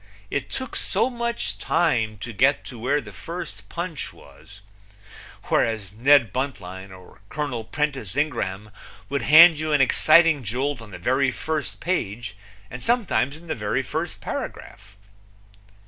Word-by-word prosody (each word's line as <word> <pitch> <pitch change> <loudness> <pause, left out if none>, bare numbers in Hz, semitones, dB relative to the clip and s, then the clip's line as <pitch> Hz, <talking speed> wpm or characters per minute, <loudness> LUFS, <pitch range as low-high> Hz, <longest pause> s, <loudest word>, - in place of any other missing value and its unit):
It - - -2
took 260 -2 -5
so 260 - +1
much 235 -1 -3
time 115 -10 +1
to 120 +2 -6
get 135 +7 +2
to 120 - -9
where 140 +5 +1
the - - -11
first 105 - -8
punch 170 -3 -5
was, 100 +9 -16 0.8
whereas 105 -4 0
Ned 125 +2 +4
Buntline 95 -8 -4
or 95 0 -15
Col. 145 -7 -3
Prentiss 135 -4 -2
Ingraham 105 -9 -2 0.4
would 140 - -1
hand 160 +1 +8
you 155 -1 -1
an 145 - +4
exciting 155 +3 +5
jolt 125 +5 -2
on 115 - -11
the 90 - -8
very 130 +8 +2
first 130 -4 -3
page, 115 - -2 0.4
and 125 - -7
sometimes 215 - +1
in 170 - -16
the 160 - -2
very 105 +4 -1
first 160 +7 -4
paragraph. - - -7
130 Hz, 145 wpm, -24 LUFS, 105-155 Hz, 0.8 s, hand